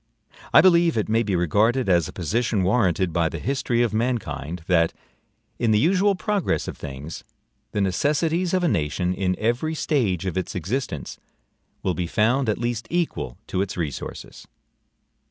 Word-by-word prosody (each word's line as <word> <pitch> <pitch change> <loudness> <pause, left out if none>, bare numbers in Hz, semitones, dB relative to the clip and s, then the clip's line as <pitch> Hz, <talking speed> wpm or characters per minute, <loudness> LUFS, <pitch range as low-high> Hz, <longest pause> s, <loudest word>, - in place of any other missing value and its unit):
I - - +8
believe 170 -5 +4
it 110 - 0
may 115 +1 +3
be 100 -5 -1
regarded 105 - +2
as 85 -4 +3
a - - -8
position 105 +4 0
warranted 95 -4 +2
by 85 -1 +2
the - - -5
history 130 -3 0
of 115 -3 -1
mankind, 110 - -2
that, 85 -2 +3 0.7
IN 120 - +1
THE 110 - +4
USUAL 190 - +3
PROGRESS 205 0 -1
OF - - -5
THINGS, 70 +2 -8 0.5
THE 105 - -1
NECESSITIES 155 - +1
OF 185 - +1
A - - +3
NATION, 90 - 0
IN 90 -1 0
EVERY 120 +8 0
STAGE 110 - 0
OF 95 0 -1
ITS 90 - -5
EXISTENCE, 95 - -3 0.6
WILL 95 - +1
BE 85 +1 -2
FOUND 120 +7 +2
AT 105 - +1
LEAST 120 -1 -3
EQUAL 165 - -2
TO 95 - -1
ITS 95 -1 -3
RESOURCES. 80 -6 -6
110 Hz, 165 wpm, -24 LUFS, 90-135 Hz, 0.7 s, I